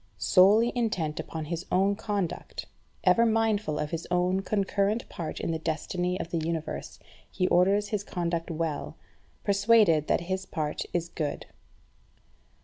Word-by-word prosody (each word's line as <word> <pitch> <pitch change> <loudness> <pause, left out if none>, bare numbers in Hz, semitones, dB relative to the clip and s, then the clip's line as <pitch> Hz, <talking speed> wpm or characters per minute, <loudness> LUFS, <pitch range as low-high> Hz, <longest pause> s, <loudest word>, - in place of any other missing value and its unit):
Solely 195 - +5
intent 190 -11 -1
upon 160 -1 -5
his 170 +2 -4
own 195 +2 +3
conduct, 200 -4 -3 0.4
ever 235 - +5
mindful 220 -7 +1
of 150 0 -3
his 165 -1 -4
own 180 +1 +2
concurrent 200 +2 0
part 165 -3 -5
in - - -2
the 160 - -2
destiny 175 +3 -2
of 165 - -5
the 170 - 0
Universe, 160 -1 -4 0.3
he 185 - 0
orders 200 +3 +3
his 210 -2 -1
conduct 170 -3 -2
well, 160 -2 -3 0.5
persuaded 200 -6 +4
that - - +2
his 190 +2 -3
part 155 -3 -3
is 175 -1 -1
good. 155 -3 -4
180 Hz, 140 wpm, -28 LUFS, 165-200 Hz, 0.5 s, Solely